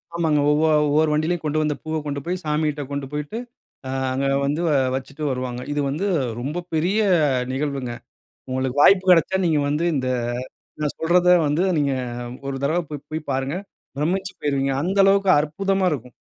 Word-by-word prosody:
ஆமாங்க. 160 -3 +2
ஒவ்வொரு 155 +1 +3
ஒவ்வொரு 155 +2 +3
வண்டியிலயும், 160 +3 0
கொண்டு 155 +1 +1
வந்த 150 -1 +1
பூவ 160 0 -3
கொண்டு 145 -1 -3
போய் 180 +1 -2
சாமிட்ட 150 -1 0
கொண்டு 140 -1 -3
போய்ட்டு, 150 +8 -4 0.8
அங்க 135 +1 -1 0.2
வந்து 145 +4 -1 0.3
வச்சிட்டு 140 +3 -6
வருவாங்க. 125 -1 -4
இது 145 0 0
வந்து 160 +9 -1 0.3
ரொம்ப 150 +7 -3
பெரிய 180 +7 +1 0.5
நிகழ்வுங்க. 135 -2 -2 0.6
உங்களுக்கு 130 +1 -1
வாய்ப்பு 190 -1 +6
கிடைச்சா 180 +2 +4
நீங்க 160 -3 +2
வந்து, 150 +4 0
இந்த 130 -2 -1 0.7
நான் 150 -1 -1
சொல்றத 175 +2 +3 0.2
வந்து 150 +5 +1
நீங்க 140 -2 +1 0.5
ஒரு 135 - -3
தடவ 160 +5 +1
போய் 150 -1 -7
போய் 155 0 -5
பாருங்க. 135 +3 -1 0.4
பிரம்மிச்சு 190 +6 -1
போய்ருவீங்க! 140 -2 0
அந்த 190 +5 -1
அளவுக்கு 195 0 +3
அற்புதமா 190 +6 0
இருக்கும். 125 -4 -5
150 Hz, 155 wpm, -22 LUFS, 140-170 Hz, 0.8 s, வாய்ப்பு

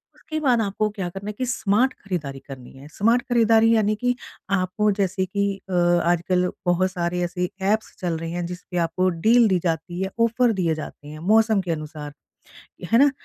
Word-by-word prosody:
उसके 310 -1 -5
बाद 255 -6 +2
आपको 210 +1 -1
क्या 200 -3 -4
करना 195 +3 -8
है - - -4
कि 255 - -1
स्मार्ट 245 0 +1
खरीदारी 155 -9 -4
करनी 130 -3 -10
है। 135 +2 -12
स्मार्ट 230 +4 +3
खरीदारी, 225 -1 +4
यानी 215 -1 +2
कि 245 +3 0 0.4
आपको 185 +3 +1
जैसे 190 -1 0
कि 200 +2 -1 0.2
अ, - - -4 0.3
आजकल 175 +1 +1 0.2
बहुत 180 +1 +2
सारे 175 -1 -2
ऐसे 180 0 -2
ऐप्स 215 +3 0
चल 175 -3 -2
रहे 165 0 -5
हैं, 175 0 -3
जिसपे 180 +1 -7
आपको 175 +2 +1 0.2
डील 235 +1 +6
दी 190 -3 +2
जाती 175 +1 -2
है, 190 - -1
ऑफ़र 230 +1 +3
दिए 170 -5 0
जाते 150 -1 -9
हैं, 155 +1 -9
मौसम 220 -1 +4
के 180 -2 -3
अनुसार। 155 -2 -6 0.8
है 230 - +6
ना? 285 +1 +6
190 Hz, 190 wpm, -23 LUFS, 175-220 Hz, 0.8 s, डील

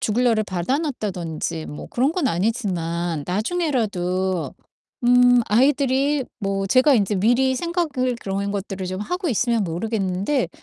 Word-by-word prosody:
죽을 235 +4 0
날을 220 -3 +3
받아 185 +9 -1
놨다든지 175 - -4
뭐 150 - -8
그런 265 +6 +1
건 335 -7 0
아니지만 175 - -1
나중에라도 190 - -1 0.5
음 245 0 +6
아이들이 270 +3 +2 0.2
뭐 195 0 -1
제가 260 +7 +4
인제 205 -2 +1
미리 245 +6 +3
생각을 290 -6 -1
그런 200 +1 -2
것들을 195 -1 -4
좀 185 +1 -4
하고 360 - -2
있으면 235 -2 +1
모르겠는데 195 - -1
215 Hz, 305 characters per minute, -22 LUFS, 185-260 Hz, 0.5 s, 음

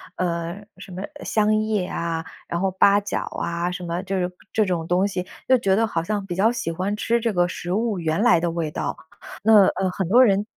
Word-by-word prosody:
呃， 170 -1 -2 0.2
什 - - -11
么 185 +2 -6 0.2
香 215 0 +2
叶 215 -3 0
啊， 165 -2 -3 0.2
然 170 - -2
后 190 +1 0
八 200 +2 +4
角 205 0 -3 0.2
啊， 170 +1 -2
什 180 0 -6
么 170 +1 -3
这 195 0 -2
种 180 - -12 0.2
这 215 - +3
种 170 -3 -2
东 180 +3 +2
西， 180 -3 -3 0.2
就 260 - +5
觉 195 -5 +2
得 225 +3 +3
好 170 -7 -1
像 205 +2 -2
比 180 -3 -4
较 210 +5 +3
喜 240 -8 -3
欢 185 +5 -2
吃 230 +3 +1
这 230 -1 0
个 175 -1 +2
食 175 -1 -5
物 215 -1 0
原 165 +2 0
来 180 -8 +5
的 170 +1 0
味 165 -2 -3
道。 - - -3 0.5
那， 215 -2 +7
呃， 190 - 0
很 190 -1 -2
多 240 +8 +6
人 200 -3 +3
190 Hz, 245 characters per minute, -23 LUFS, 175-210 Hz, 0.5 s, 那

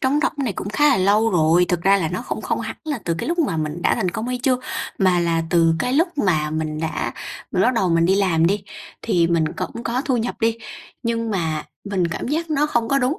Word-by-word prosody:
trống 265 +3 +2
rỗng - - +1
này 230 - -1
cũng 195 - -5
khá 295 +9 +3
là 275 - +4
lâu 205 +4 +3
rồi. 170 0 +4
Thực 175 -2 0
ra 195 +2 +5
là 170 -5 -1
nó 180 +7 -4
không - - -4
không - - -1
hẳn - - -5
là 295 -4 -2
từ 165 - 0
cái - - -3
lúc 345 +1 -1
mà 285 - +1
mình 155 +2 -3
đã - - +3
thành 180 - -1
công 220 +7 -4
hay 250 0 -2
chưa, 260 -2 +2 0.4
mà 185 -3 +3
là 165 -1 +1
từ 165 -2 +4
cái 250 0 -1
lúc 325 +6 +3
mà 155 - +1
mình 155 0 -3
đã 160 - -2 0.4
mình - - +2
bắt 255 - +3
đầu 190 -5 +1
mình 165 0 +3
đi 190 - +3
làm 180 -5 +2
đi, 200 +4 0 0.4
thì 175 -7 +2
mình 165 -1 +2
cũng 235 - -5
có 245 +3 -1
thu 265 -6 +1
nhập 235 +1 -2
đi, 225 0 +1 0.4
nhưng 230 -1 -1
mà 160 -6 -1 0.3
mình 185 -4 +1
cảm 165 - -4
giác 320 +3 -2
nó 300 0 +2
không 235 -6 0
có 275 - +3
đúng, 270 +4 0
195 Hz, 260 wpm, -21 LUFS, 170-250 Hz, 0.4 s, ra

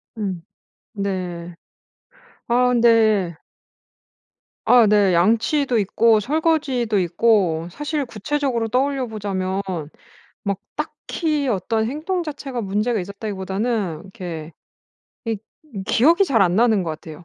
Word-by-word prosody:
음 195 -6 -3 0.5
네. 180 -4 -4 0.9
아 250 +1 +3
근데 220 -7 +4 1.3
아 245 -3 +6
네. 205 -3 +4
양치도 230 - +2
있고 220 +3 +3
설거지도 270 -5 +1
있고 175 -2 +2
사실 295 - -3
구체적으로 235 +1 -2
떠올려 265 +2 0
보자면 195 -3 -2 0.8
막 200 -2 -1 0.2
딱히 300 -1 -2
어떤 220 +2 0
행동 335 +6 -2
자체가 275 -5 -5
문제가 210 +3 0
있었다기보다는 200 -1 -3
이렇게 170 -4 -7 0.7
이 225 -1 -1 0.5
기억이 335 - +4
잘 240 - +3
안 180 0 +2
나는 225 -4 +4
것 165 - -3
같아요. 160 +1 -9
220 Hz, 230 characters per minute, -21 LUFS, 190-250 Hz, 1.3 s, 아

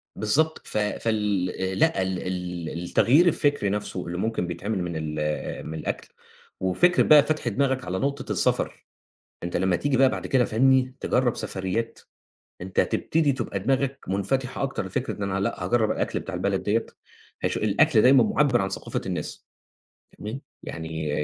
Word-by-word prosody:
بالضبط 155 +10 +1
ف - - -1
فال 105 -3 0
آآ 95 0 -1
لأ، 95 - +2
ال 95 -1 -2
ال 90 -3 -4
التغيير 145 - +4
الفكري 145 - +2
نَفْسه 100 -2 -3
اللي 85 - -4
ممكن 110 -3 -1
بيتعمل 95 +3 -3
من 85 -2 -4
ال 75 -1 -3
آآ، 75 0 -3
من 80 - -6
الأكل - - -4 0.5
وفكرة 175 - +3
بقى 150 -2 +7
فتْح 155 -5 -1
دماغك 130 +3 0
على 95 +1 -2
نقطة 140 +1 -2
السفر، - - 0 0.6
أنت 85 0 -3
لمّا 95 -2 +2
تيجي 140 +3 0
بقى 135 0 +6
بعد - - -4
كده 130 -2 +3
فاهمني، 130 +3 +3
تجرّب 125 -2 +1
سفريات، 105 +2 -2 0.6
أنت 95 +1 -2
تبتدي 155 -3 +1
تبقى 115 -6 -3
دماغك 135 +5 0
منفتحة 125 +9 -1
أكتر 135 -7 -2
لفكرة 125 +8 -3
إن 100 - -4
أنا 95 -1 -1
لأ، 100 - -2
هاجرّب 115 -3 +2
الأكل - - -1
بتاع - - -6
البلد - - -1
دِيّة، - - +1 0.6
هش - - 0
الأكل 110 +4 +3
دايمًا 130 +3 +6
مُعبّر 145 - +2
عن 95 - -1
ثقافة - - -3
الناس - - -4 0.7
تمام، 110 +6 -6 0.2
يعني 80 -2 -5
110 Hz, 165 wpm, -25 LUFS, 95-135 Hz, 0.7 s, بقى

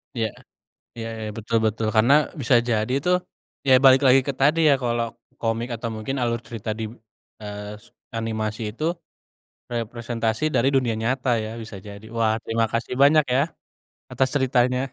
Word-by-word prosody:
Iya. 115 -1 0 0.7
Iya, 115 0 -4 0.2
ya, 105 - -4
betul 115 +1 0
betul. 110 0 0
Karena 115 +5 +5 0.3
bisa 125 0 +3
jadi 110 +2 0
tuh, 180 0 +4 0.5
ya, 130 - +6
balik 130 +1 +8
lagi 130 +1 +6
ke 140 - 0
tadi 150 +4 +4
ya, 140 - +6
kalau 120 -1 0 0.4
komik 115 +1 -1
atau 115 0 -4
mungkin 110 +6 -4
alur 115 -1 0
cerita 115 -2 -6
dib 110 -1 -4 0.5
eee, 105 0 -6
sup - - -19 0.2
animasi 110 0 -3
itu 155 +8 -4 0.8
representasi 115 0 -2
dari 125 +2 +3
dunia 125 -4 +2
nyata 130 +2 0
ya, 110 - -5
bisa 110 -2 -9
jadi. 100 +1 -10
Wah, 110 -1 +2
terima 115 0 +1
kasih 115 +2 -2
banyak 150 +1 +6
ya, 135 - +4 0.7
atas 130 0 +1
ceritanya. 125 -1 +2
115 Hz, 160 wpm, -23 LUFS, 110-130 Hz, 0.8 s, balik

